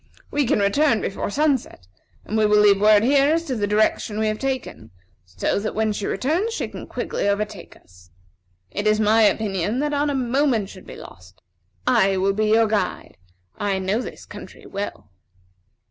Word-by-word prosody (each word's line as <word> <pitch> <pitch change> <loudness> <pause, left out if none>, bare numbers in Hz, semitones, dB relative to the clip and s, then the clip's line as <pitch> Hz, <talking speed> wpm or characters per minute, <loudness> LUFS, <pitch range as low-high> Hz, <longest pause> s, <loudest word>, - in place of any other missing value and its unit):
We 290 -3 0
can - - +2
return 225 +5 +2
before 195 - -3
sunset, 275 - -1 0.4
and 215 - -4
we 215 -1 +3
will 210 0 +4
leave 200 -1 +5
word 210 0 +5
here 280 +4 +4
as 330 - -1
to 260 - -3
the 205 -3 -1
direction 210 0 +1
we 220 - 0
have 215 - -3
taken, 260 - -4 0.4
so 90 - -1
that 215 +1 -4
when 220 0 0
she 205 - -4
returns, 345 - -1
she - - -3
can - - -9
quickly 205 - -2
overtake 205 -2 -4
us. 90 0 -21 0.6
It 205 +1 -2
is 215 0 +3
my 220 +1 +4
opinion 205 -1 +1
that 295 - 0
not 290 0 0
a 285 - -1
moment 255 -4 0
should 185 -3 -13
be - - -9
lost. 90 0 -14 0.5
I 195 0 +3
will 195 +1 +1
be 215 +2 0
your 225 +1 +4
guide. 215 -1 -2 0.4
I 200 -1 0
know 190 +5 -1
this - - -9
country - - -12
well." 200 - -6
215 Hz, 185 wpm, -22 LUFS, 200-255 Hz, 0.6 s, leave